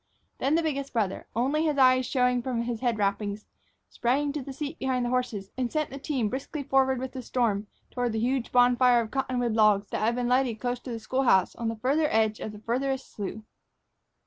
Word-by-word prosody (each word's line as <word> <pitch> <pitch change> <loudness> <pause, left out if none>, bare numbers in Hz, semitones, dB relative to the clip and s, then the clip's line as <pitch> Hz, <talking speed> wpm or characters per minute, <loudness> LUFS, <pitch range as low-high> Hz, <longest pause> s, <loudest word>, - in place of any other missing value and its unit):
Then 280 +3 +2
the 335 - +2
biggest 280 -3 -2
brother, 210 -5 -1
only 275 +7 +1
his 305 -3 0
eyes 255 -2 +5
showing 250 -2 +2
from 240 -2 -2
his 235 -1 -3
head 240 -2 0
wrappings, 205 0 -1 0.4
sprang 280 +4 0
to 295 0 -4
his 270 0 -8
seat 300 +1 -5
behind 255 -2 0
the - - -1
horses 240 -6 -2
and 245 -2 -1
sent 310 -1 -1
the 275 - -7
team 270 -6 -1
briskly 275 +5 -4
forward 265 -1 +2
with 260 +1 -4
the 260 - -6
storm 225 -5 0 0.2
toward 245 -2 -1
the 220 - -1
huge 250 +1 -1
bonfire 245 0 +5
of 220 - -6
cottonwood 250 -3 -1
logs 210 -2 +3
that - - -1
had 230 +2 +2
been 245 -1 -1
lighted 250 -3 +1
close 245 0 -2
to 250 - -10
the 230 - -3
school 255 +4 -1
house 190 -8 +3
on 230 - -3
the 225 - -1
farther 275 +8 +1
edge 220 -1 +1
of 220 - -5
the 210 - -10
farthest 260 +5 -2
slough. 210 +1 -5
250 Hz, 220 wpm, -27 LUFS, 225-270 Hz, 0.4 s, eyes